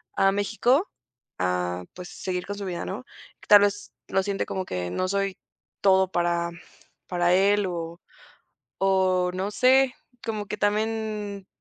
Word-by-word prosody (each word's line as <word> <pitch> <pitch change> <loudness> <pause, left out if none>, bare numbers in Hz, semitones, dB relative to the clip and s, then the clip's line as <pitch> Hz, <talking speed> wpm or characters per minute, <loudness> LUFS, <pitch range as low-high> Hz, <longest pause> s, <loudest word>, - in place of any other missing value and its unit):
a 195 0 +4
México 235 - +1 0.5
a, 90 0 -1
pues, 180 -1 -9
seguir 180 -1 -4
con 205 0 -4
su 200 - -5
vida, 180 -2 -3
¿no? - - -5 0.4
Tal 205 -1 +9
vez 205 0 0
lo 195 - +1
siente 200 -1 -2
como 190 -1 -3
que 90 - -3
no 185 - -1
soy 195 0 -1 0.4
todo 190 -1 +4
para 170 0 +1 0.6
para 175 -1 +1
él 200 +2 +4
o 170 -1 -5 0.8
o, 185 -2 +2
no 190 +3 -2
sé, 260 +2 +4 0.3
como 215 -2 -3
que 210 0 -4
también 210 -1 -1
195 Hz, 145 wpm, -26 LUFS, 180-205 Hz, 0.8 s, Tal